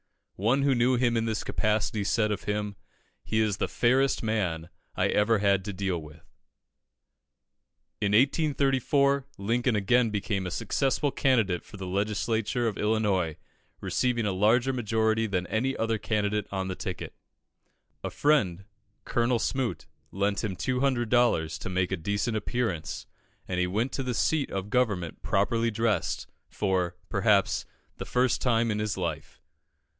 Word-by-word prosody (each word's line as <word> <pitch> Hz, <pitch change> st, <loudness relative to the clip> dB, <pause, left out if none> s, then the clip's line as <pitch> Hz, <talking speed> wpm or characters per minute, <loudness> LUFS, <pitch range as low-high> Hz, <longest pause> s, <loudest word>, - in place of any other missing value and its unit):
One 120 Hz, +8 st, +2 dB
who 140 Hz, -1 st, +3 dB
knew 125 Hz, +1 st, +3 dB
him 120 Hz, -1 st, +2 dB
in 115 Hz, 0 st, +1 dB
this 110 Hz, -2 st, -2 dB
capacity 105 Hz, -1 st, 0 dB
said 105 Hz, +2 st, +1 dB
of 105 Hz, -, -3 dB
him 105 Hz, -1 st, -2 dB, 0.5 s
"He 110 Hz, -, 0 dB
is 105 Hz, -3 st, +1 dB
the -, -, -1 dB
fairest 130 Hz, +2 st, +2 dB
man 90 Hz, -7 st, -1 dB, 0.3 s
I -, -, +1 dB
ever 105 Hz, +2 st, +3 dB
had 100 Hz, -2 st, +2 dB
to 105 Hz, -, -4 dB
deal 95 Hz, -3 st, -2 dB
with." 75 Hz, +1 st, -14 dB, 1.8 s
In 100 Hz, 0 st, +1 dB
1834, 140 Hz, +1 st, +2 dB
Lincoln 115 Hz, +4 st, 0 dB
again 115 Hz, +4 st, +3 dB
became 100 Hz, -2 st, -2 dB
a -, -, -2 dB
successful 135 Hz, -, 0 dB
candidate 110 Hz, -12 st, +1 dB
for -, -, -12 dB
the 95 Hz, -, -6 dB
Legislature 105 Hz, +4 st, 0 dB
of 110 Hz, -, -3 dB
Illinois, 105 Hz, -7 st, +1 dB, 0.4 s
receiving 120 Hz, -3 st, 0 dB
a 100 Hz, -, +1 dB
larger 115 Hz, +7 st, +3 dB
majority 110 Hz, -1 st, +1 dB
than 90 Hz, -3 st, -1 dB
any 110 Hz, +8 st, -1 dB
other 115 Hz, -1 st, 0 dB
candidate 105 Hz, -1 st, -1 dB
on 95 Hz, -1 st, -2 dB
the 95 Hz, -, -3 dB
ticket. -, -, -5 dB, 0.9 s
A -, -, -2 dB
friend, 100 Hz, -, +1 dB, 0.4 s
Colonel 120 Hz, +1 st, +1 dB
Smoot, 125 Hz, +1 st, -2 dB, 0.3 s
lent 100 Hz, +1 st, 0 dB
him 100 Hz, -4 st, -2 dB
200 125 Hz, 0 st, 0 dB
dollars 120 Hz, -10 st, +2 dB
to -, -, -5 dB
make 90 Hz, 0 st, 0 dB
a -, -, +1 dB
decent 100 Hz, +7 st, -1 dB
appearance, 110 Hz, -6 st, -2 dB, 0.4 s
and 90 Hz, -1 st, -2 dB
he 90 Hz, -, +2 dB
went 110 Hz, +8 st, -1 dB
to -, -, -3 dB
the 125 Hz, -2 st, -2 dB
seat 155 Hz, +2 st, +1 dB
of 95 Hz, +1 st, -4 dB
government 105 Hz, -10 st, 0 dB
properly 115 Hz, +4 st, +1 dB
dressed, 110 Hz, -4 st, 0 dB, 0.2 s
for, 95 Hz, -4 st, -1 dB
perhaps, -, -, +2 dB, 0.3 s
the -, -, -5 dB
first 125 Hz, 0 st, +1 dB
time 115 Hz, -2 st, +2 dB
in 105 Hz, -, -1 dB
his 105 Hz, -1 st, -2 dB
life. 90 Hz, -3 st, -4 dB
110 Hz, 150 wpm, -28 LUFS, 100-120 Hz, 1.8 s, who